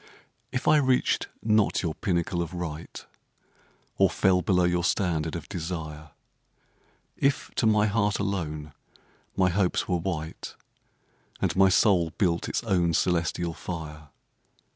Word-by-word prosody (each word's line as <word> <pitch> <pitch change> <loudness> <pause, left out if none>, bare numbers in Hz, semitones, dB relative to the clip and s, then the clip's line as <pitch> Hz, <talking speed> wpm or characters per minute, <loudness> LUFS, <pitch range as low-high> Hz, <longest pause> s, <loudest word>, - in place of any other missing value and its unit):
If 125 - -3
I 155 - +6
reached 130 -3 +2 0.2
not 110 -3 +2
your 80 -3 -1
pinnacle 85 -2 -1
of 85 +1 -5
right, 85 -2 -6 0.9
Or - - +5
fell 95 -1 +2
below 90 -2 +2
your 90 0 +1
standard 85 -3 0
of 85 - -6
desire, 80 -4 -6 1.1
If 140 0 0
to 115 - +3
my 105 -1 +4
heart 105 -1 +1
alone 80 -7 -3 0.6
my 95 -2 +3
hopes 90 0 0
were 90 - +1
white. 80 -2 -5 0.8
And - - 0
my 95 0 +5
soul 95 -3 +3
built 85 -4 0
its - - -2
own 90 -6 +1
celestial 85 -1 0
fire. 75 -3 -7
90 Hz, 130 wpm, -27 LUFS, 80-100 Hz, 1.1 s, I